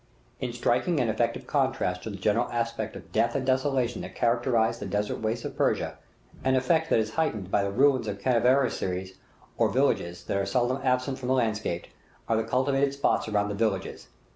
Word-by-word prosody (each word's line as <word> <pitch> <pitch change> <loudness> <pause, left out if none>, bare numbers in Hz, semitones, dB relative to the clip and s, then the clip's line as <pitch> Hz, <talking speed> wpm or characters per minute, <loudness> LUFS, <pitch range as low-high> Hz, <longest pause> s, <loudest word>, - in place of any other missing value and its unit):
In 125 -2 -3
striking 125 +7 +1
and 115 -3 +2
effective - - -1
contrast 90 0 0
to 110 - -6
the 100 - -6
general 105 +5 +1
aspect 115 -2 -2
of - - -11
death 115 +2 +1
and 135 -2 -1
desolation 130 -2 +1
that - - -8
characterizes 120 -1 +1
the 100 - -5
desert 105 +2 -1
wastes 110 +2 -2
of - - -5
Persia - - 0 0.5
an 130 0 +3
effect 160 +5 +2
that - - +4
is 110 -1 0
heightened 110 - -1
by 100 - +3
the 100 - -1
ruins 130 +2 +3
of 100 -1 -4
caravansaries 115 -6 +1 0.4
or 115 -2 +4
villages, 100 -7 0
that - - -2
are 100 - 0
seldom 125 +5 +1
absent 130 +1 0
from 125 - -5
the 130 - +3
landscape 110 -7 -1 0.4
are 115 - +2
the 110 - +1
cultivated 135 +4 +1
spots 140 -4 +1
around 105 -1 0
the - - -2
villages. 110 +2 -2
115 Hz, 190 wpm, -27 LUFS, 105-130 Hz, 0.5 s, that